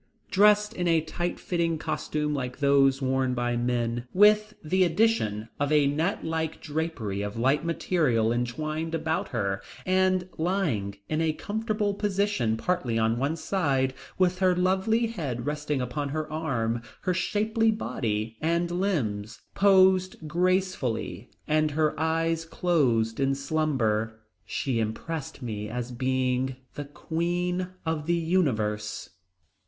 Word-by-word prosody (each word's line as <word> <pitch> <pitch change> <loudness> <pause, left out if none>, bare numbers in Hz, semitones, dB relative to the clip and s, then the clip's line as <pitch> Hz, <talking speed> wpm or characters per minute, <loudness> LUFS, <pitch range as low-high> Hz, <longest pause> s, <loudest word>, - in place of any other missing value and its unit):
Dressed 210 +1 +5
in 175 -1 -2
a 165 -1 +4
tight 175 +3 -3
fitting 170 -2 0
costume 150 -1 -2
like 125 -3 -3
those 140 -1 +3
worn 130 -1 +1
by 120 0 0
the 120 - 0
men, 120 0 -1
with 210 +2 +5
the 185 +4 +2
addition 160 - +1
of 145 +1 0
a 150 -2 +5
net 155 +7 0
like 160 -1 -2
drapery 145 -11 -3
of 105 +1 -4
light 135 +6 +2
material 150 -9 +1
entwined 155 +7 -2
about 160 0 -1
her, 100 -4 -2 0.2
and 185 -1 +2
lying 160 - 0
in 155 +1 0
a 160 -1 +1
comfortable 210 +2 -1
position 200 - 0
partly 130 -6 -1
on 115 +1 +1
one 140 +4 0
side, 140 -8 0 0.2
with 185 -1 +2
her 185 -2 +4
lovely 190 +6 +2
head 145 - -4
resting 150 -2 -1
upon 135 +4 -3
one 155 +2 -2
arm, 120 -8 -1 0.2
her 185 - 0
shapely 215 +5 +1
body 115 - -2
and 170 +2 +1
limbs 130 - -1
posed 185 -4 +4
gracefully 180 -7 -1 0.2
and 155 0 +2
her 155 +1 +1
eyes 165 +1 +1
closed 135 -10 +1
in 135 0 +2
slumber, 130 -7 0 0.3
she 130 -4 -1
impressed 135 +6 -4
me 105 -3 -4
as 125 +1 -4
being 130 +1 0 0.2
the 145 - -5
queen 175 +4 -2 0.2
of 160 -2 -2
the 170 - +3
universe. 110 - 0
155 Hz, 135 wpm, -27 LUFS, 125-180 Hz, 0.3 s, Dressed